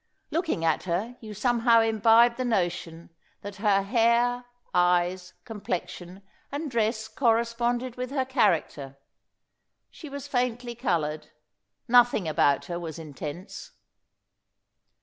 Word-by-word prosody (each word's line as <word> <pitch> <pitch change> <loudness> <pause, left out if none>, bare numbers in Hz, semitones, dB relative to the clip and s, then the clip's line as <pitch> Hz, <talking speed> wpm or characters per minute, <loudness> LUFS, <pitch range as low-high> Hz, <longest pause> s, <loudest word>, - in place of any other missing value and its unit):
Looking 320 - -1
at 160 +1 +1
her, 195 +8 -2
you 215 -2 -9
somehow 235 +1 +3
imbibed 225 +2 +4
the 255 - -1
notion 175 -7 -2 0.3
that 205 0 -8
her 200 -1 +2
hair, 240 +3 +2 0.3
eyes, 180 +1 +1
complexion, 190 -3 -6 0.3
and 290 0 -4
dress 220 -1 0
corresponded 235 +1 0
with 250 0 -4
her 270 -1 -1
character. 155 - 0 0.9
She 310 - -11
was 280 0 -7
faintly 245 -2 -2
coloured. 170 - -2 0.6
Nothing 245 -6 +4
about 150 -3 +2
her 175 -1 -5
was 165 -1 -7
intense. 155 - -8
225 Hz, 110 wpm, -26 LUFS, 175-245 Hz, 0.9 s, imbibed